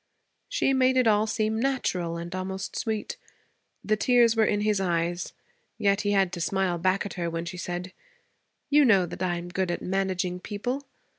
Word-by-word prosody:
She - - +1
made 260 0 +3
it 255 - +4
all 215 0 +3
seem 215 0 0
natural 185 -10 -1
and 170 +1 -6
almost 190 +1 -4
sweet. 220 - -3 0.7
The 215 - +2
tears 235 +1 +4
were 220 -1 +4
in 205 0 +1
his 210 -2 +1
eyes, 175 -1 -1 0.5
yet 200 -2 +2
he 205 - -1
had 195 -3 +2
to 175 - -4
smile 185 -1 0
back 185 +3 +1
at 205 - -5
her 170 -2 -2
when 165 0 -4
she 180 +1 -6
said, 180 +1 -5 0.8
'You 295 +1 +6
know 200 -8 +5
that 175 - -8
I 180 -2 0
am 175 +1 -6
good 185 0 -1
at 175 - -3
managing 185 -1 -1
people. 245 +8 -4
195 Hz, 190 wpm, -27 LUFS, 180-220 Hz, 0.8 s, You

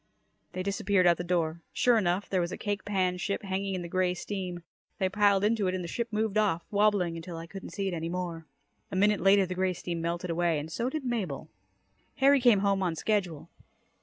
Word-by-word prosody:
They 185 - -3
disappeared 200 -1 +1
out 170 -1 +5
the - - -3
door. 170 -2 -1
Sure 240 -2 +4
enough, 185 0 0
there 185 -2 +1
was 170 +1 -2
a - - -5
cake 205 -1 -3
pan 185 -3 0
ship 200 +3 -2
hanging 195 0 -2
in 180 - -4
the - - -5
grey 180 +1 +1
steam. 180 -2 -5 0.3
They 190 -2 +1
piled 200 0 +3
into 210 -2 +2
it 185 - 0
and 185 - -3
the - - -5
ship 235 +7 -2
moved 215 -1 0
off, 185 -6 +1
wobbling, 200 -5 +2
until 165 0 -7
I 165 - -6
couldn't 195 +3 -9
see 200 -1 -3
it 190 - -2
any 165 0 -3
more. 170 -2 -4 0.4
A - - -4
minute 205 +2 +3
later, 195 0 +5
the 185 - -4
grey 185 0 0
steam 170 -1 -4
melted 170 +1 -2
away 170 -1 +1
and 150 +2 -5
so 235 +8 -1
did 300 0 -4
Mabel. 205 - -3 0.7
Harry 275 0 +5
came 235 -6 +5
home 200 -1 +2
on 175 -3 0
schedule. 180 -4 -1
185 Hz, 225 wpm, -29 LUFS, 175-205 Hz, 0.7 s, out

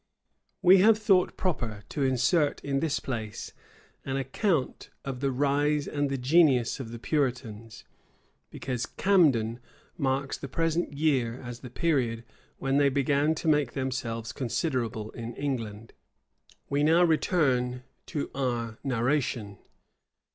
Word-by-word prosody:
We 185 +1 +8
have 215 +3 +6
thought 195 -4 +2
proper 115 - -2
to 145 - -4
insert 135 +4 +2
in 140 -1 0
this 155 0 0
place 110 -5 -5 0.5
an 135 0 -2
account 135 - -1 0.2
of 135 -2 -4
the 135 0 0
rise 145 +2 +1
and 145 -1 -1
the 135 - -1
genius 135 -2 +3
of 125 -4 -6
the 120 - -6
Puritans; 120 -5 -2 0.7
because 125 -2 -4
Camden 135 - +2 0.4
marks 135 -1 -1
the - - -6
present 165 +4 0
year 135 -5 +1
as 120 -1 -7
the 125 - -9
period 120 -6 0 0.3
when 135 +1 0
they 140 -1 +4
began 140 +3 +2
to 160 - -4
make 150 -5 +2
themselves 125 -4 -3
considerable 120 -4 -2
in 115 0 -7
England. 115 -6 -4 0.7
We 140 +1 0
now 165 +4 +5
return 135 -7 +1 0.2
to 145 - -3
our 120 -4 -2
narration. 120 -5 -1
135 Hz, 130 wpm, -28 LUFS, 120-150 Hz, 0.7 s, We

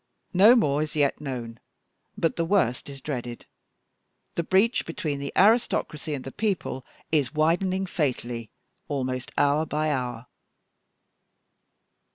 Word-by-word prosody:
No 205 +7 +8
more 150 - +2
is 155 0 -3
yet 145 -1 +1
known, 120 -5 -5 0.6
but 165 - +1
the 170 - 0
worst 165 - +1
is 135 -1 -9
dreaded. 120 -5 -5 0.9
The - - 0
breach 195 +8 +2
between 155 -3 -3
the 140 0 -4
aristocracy 195 - +2
and 130 - -6
the 135 - -7
people 190 - -2 0.3
is 145 -3 +1
widening 185 +5 +2
fatally 125 - -2 0.4
almost 130 -3 -3
hour 145 +2 +3
by 155 0 -1
hour." 125 -3 -3
150 Hz, 125 wpm, -26 LUFS, 130-170 Hz, 0.9 s, No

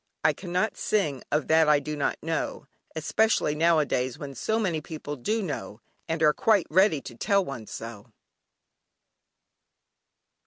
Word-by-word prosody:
"I - - +4
cannot 185 +3 -2
sing 150 - 0
of 150 0 0
that 160 -1 +5
I 150 -1 +5
do 150 +1 -5
not 145 - -1
know," 160 -2 -3 0.3
especially 160 +1 +1
nowadays 150 -6 +1
when 140 -2 -7
so 220 +10 -1
many 180 -8 0
people 150 -2 -6
do 215 - -1
know, 105 - -5 0.3
and 160 0 -1
are 150 -1 +6
quite 210 -2 +3
ready 185 -4 +4
to 120 - -9
tell 200 - +1
one 120 -6 -7
so. 115 -3 -8
155 Hz, 145 wpm, -27 LUFS, 140-185 Hz, 0.3 s, are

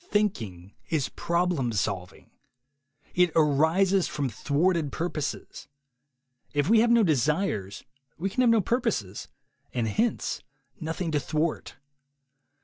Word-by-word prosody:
Thinking 110 - -1 0.2
is 150 -6 0
problem 170 -7 0
solving. 95 -3 -3 0.8
It 180 -1 +3
arises 165 +5 +3
from 140 -3 -2
thwarted 150 - 0
purposes. 160 -2 -4 0.9
If 145 0 +2
we 225 +2 +5
have 235 +2 +4
no 235 -1 +5
desires, 150 - 0 0.3
we 180 - -2
can 200 +6 0
have 245 - +5
no 230 -2 +5
purposes, 205 - -1 0.5
and 120 -2 0
hence 225 - -1 0.4
noth 160 +1 -4
ing 170 -3 -1
to 150 - +1
thwart. 155 +2 -2
160 Hz, 120 wpm, -27 LUFS, 135-190 Hz, 0.9 s, we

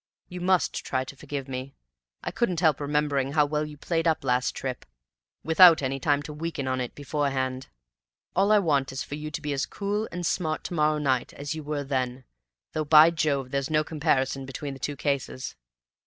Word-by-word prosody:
You 180 0 -7
must 185 0 +1
try 130 -1 -1
to 130 - -10
forgive 140 -1 -6
me. 130 +1 -6 0.5
I - - -3
couldn't 185 -9 0
help 160 -5 +3
remembering 145 -2 0
how 150 -1 +4
well 150 +1 -1
you 150 -1 -10
played 165 +2 -1
up 160 -2 +1
last 125 -1 +1
trip, 130 -2 -4 0.6
without 165 -1 +7
any 135 +1 -1
time 145 +1 +1
to 150 - -7
weaken 150 -3 -4
on 130 0 0
it 125 - -5
beforehand. 135 -3 -2 0.7
All 195 +3 +3
I 215 - +7
want 145 -8 +1
is 130 - -4
for - - -9
you 150 +1 -4
to 150 - -5
be 150 -1 -1
as 135 - -1
cool 205 +2 -2
and 175 0 -4
smart 160 -2 -1
to - - -5
morrow 155 -2 +2
night 130 -4 0
as 145 +1 -4
you 155 - -5
were 145 -1 -3
then; 130 -2 -2 0.5
though, 155 - 0
by 155 +2 +7
Jove, 140 -5 0
there's 140 -1 -1
no 155 0 +2
comparison 140 -4 0
between 140 +1 -5
the 135 - -10
two 145 - -3
cases!" 135 -2 -2
145 Hz, 200 wpm, -27 LUFS, 135-160 Hz, 0.7 s, without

